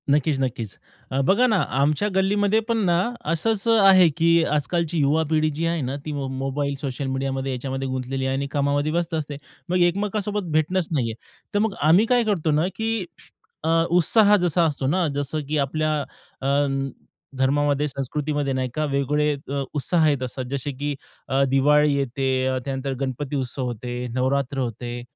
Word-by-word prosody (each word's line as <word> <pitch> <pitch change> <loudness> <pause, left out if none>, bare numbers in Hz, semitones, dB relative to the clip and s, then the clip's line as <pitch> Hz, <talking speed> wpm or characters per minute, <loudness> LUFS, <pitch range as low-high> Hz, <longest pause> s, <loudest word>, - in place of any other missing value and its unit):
नक्कीच, 145 0 +2
नक्कीच. 115 -5 -3 0.3
अ, 135 - 0
बघा 220 - +4
ना, 220 -4 +2 0.2
आमच्या 150 +8 +2
गल्लीमध्ये 205 +2 +2
पण 230 -1 +1
ना, 175 -1 +3 0.3
असंच 210 +6 +1
आहे, 195 -5 +6
की 165 0 +4
आज-कालची 160 +3 0
युवा 150 +3 +3
पिढी 155 -1 +2
जी 165 +2 -1
आहे 165 -1 0
ना, 130 +1 -3
ती 155 - -3
मो 140 -2 -3
मोबाईल, 135 +2 -2
सोशल 135 0 -3
मीडियामध्ये 135 0 -2
याच्यामध्ये 135 +1 -3
गुंतलेली 130 +1 -3
आहे 130 0 0
आणि 140 +1 -2
कामामध्ये 145 +1 0
व्यस्त 170 +1 -1
असते, 150 -2 -4 0.3
मग 180 - +2
एकमेकांसोबत 205 0 -2
भेटणंच 155 +3 +1
नाहीये. 120 -7 0 0.4
तर 205 - +2
मग 220 -1 +1
आम्ही 165 +8 +5
काय 245 0 +3
करतो 185 -8 0
ना, 155 +4 +2
की 225 -3 -1 0.6
अ, 160 - 0 0.2
उत्साह 205 +5 +5
जसा 175 -1 +2
असतो 145 -4 -1
ना, 175 +4 +1
जसं 145 +2 -2
की 155 +1 -1
आपल्या 155 +3 0 0.5
अ, 135 - -2 0.9
धर्मामध्ये, 145 +2 +2
संस्कृतीमध्ये 145 +1 -2
नाही 130 -1 -1
का 155 - 0
वेगवेगळे 145 +1 +1 0.2
अ, 140 -1 -1
उत्साह 155 +2 +2
येत 140 -3 0
असतात. 130 +1 -4
जसे, 140 +1 -2
की 145 +2 -3 0.3
अ, 135 +1 +2
दिवाळी 145 +2 +4
येते, 130 -1 0
त्यानंतर 135 0 -3
गणपती 135 +2 -3
उत्सव 130 -1 -2
होतो, 120 0 -6 0.3
नवरात्र 135 +1 0
होतं. 120 0 -4
145 Hz, 165 wpm, -23 LUFS, 135-170 Hz, 0.9 s, आहे